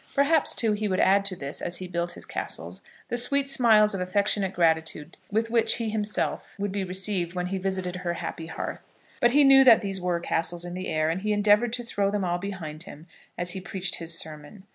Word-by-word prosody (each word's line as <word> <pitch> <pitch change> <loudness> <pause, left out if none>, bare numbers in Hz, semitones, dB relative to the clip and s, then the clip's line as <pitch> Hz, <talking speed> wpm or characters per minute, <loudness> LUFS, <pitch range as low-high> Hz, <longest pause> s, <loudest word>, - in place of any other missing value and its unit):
Perhaps, 285 +2 +2
too, 225 -2 +1
he 210 0 -2
would 185 -2 -1
add 200 +1 +4
to 195 -2 -1
this, 140 -3 -5
as 175 - -2
he 185 - -6
built 170 0 -3
his - - -7
castles, - - -5 0.3
the 240 - -1
sweet 275 +3 +2
smiles 220 -6 +4
of 195 - -3
affectionate 195 +1 0
gratitude 160 -2 0 0.2
with 225 +2 0
which 225 -1 +4
he 225 -2 -3
himself 210 -1 -2
would 205 0 -3
be 200 0 -2
received 185 -1 -1
when 180 0 -2
he 190 +1 -3
visited 185 -1 -1
her 175 -1 -3
happy 165 -1 -6
hearth. - - -7 0.3
But 240 0 +3
he 290 +1 +6
knew 270 -1 +8
that 240 -4 +7
these 195 -3 -3
were 175 -1 0
castles 170 +1 0
in 175 - -6
the 185 +1 -5
air, 155 0 0
and 180 +3 -3
he 210 +1 -1
endeavoured 210 +3 +3
to 245 -1 -1
throw 200 -4 -1
them 200 -2 -1
all 175 0 -1
behind 175 -6 -6
him 165 -4 -10 0.3
as 175 0 -2
he 190 - -5
preached 185 0 -3
his 165 0 -2
sermon. 155 +5 -5
190 Hz, 225 wpm, -26 LUFS, 175-215 Hz, 0.3 s, knew